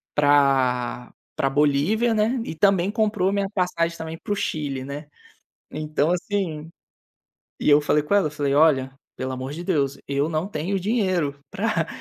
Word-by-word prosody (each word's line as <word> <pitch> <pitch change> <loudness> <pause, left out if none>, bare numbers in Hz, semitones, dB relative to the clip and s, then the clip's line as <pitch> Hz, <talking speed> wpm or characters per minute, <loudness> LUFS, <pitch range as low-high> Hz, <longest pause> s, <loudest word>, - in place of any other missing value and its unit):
pra 135 -4 +2 0.2
pra 135 - +1
Bolívia, 150 - +2
né, 225 +3 +1
e - - -5
também 195 +1 +3
comprou 210 -4 +1
a - - -1
minha 200 -1 0
passagem 170 -3 0
também 160 0 -6
para - - -5
o - - -1
Chile, 145 -8 -3
né. 145 +2 -7 0.6
Então, 155 +1 -1
assim, 175 -4 -2 0.9
e - - +2
eu 145 - +7
falei 150 0 +2
com 150 - -5
ela, 195 -7 +3
falei: 145 -2 -1
"Olha, 135 -4 +4 0.2
pelo 130 0 -4
amor 130 +2 -5
de 170 +3 -6
Deus, 140 -7 0
eu 140 +2 0
não 165 +4 -2
tenho 185 +3 -2
dinheiro 185 -9 0
pra 205 -6 -1
155 Hz, 165 wpm, -23 LUFS, 140-195 Hz, 0.9 s, eu